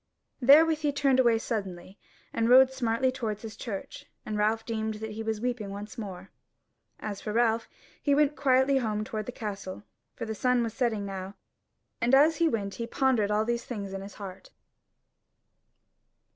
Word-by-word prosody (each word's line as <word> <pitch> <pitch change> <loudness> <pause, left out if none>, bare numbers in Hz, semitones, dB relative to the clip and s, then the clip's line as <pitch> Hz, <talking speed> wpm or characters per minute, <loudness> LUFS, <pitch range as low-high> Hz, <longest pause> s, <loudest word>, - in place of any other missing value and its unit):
Therewith 305 +5 +6
he 300 -2 +1
turned 275 -2 +2
away 235 -3 +5
suddenly, 195 -4 -5 0.3
and 230 0 +1
rode 260 +1 +7
smartly 255 0 +1
towards 225 -5 -4
his 220 -2 -7
church; 200 -3 -7 0.2
and 215 - -3
Ralph 215 +2 +1
deemed 220 -1 -2
that 220 +1 -6
he 215 +1 -6
was 220 -1 -2
weeping 240 -3 -2
once 205 +4 -7
more. 195 -5 -7 0.7
As 205 -2 -5
for 210 - -4
Ralph, 230 0 +1 0.3
he 285 -2 +2
went 295 0 +3
quietly 265 0 +3
home 215 -3 -1
toward 215 -1 -5
the - - -3
castle, 200 -4 -6 0.3
for 230 - -5
the 220 - -3
sun 250 +2 +2
was 225 -2 -3
setting 225 -4 0
now, 195 0 -6 0.7
and 245 +3 +4
as 300 +3 +5
he 335 - +3
went 200 -5 -2
he 230 - -5
pondered 245 -5 +1
all 210 +1 +1
these 235 0 -1
things 200 -5 -5
in 195 - -4
his 195 0 -10
heart. 195 -2 -9
225 Hz, 175 wpm, -28 LUFS, 210-255 Hz, 0.7 s, rode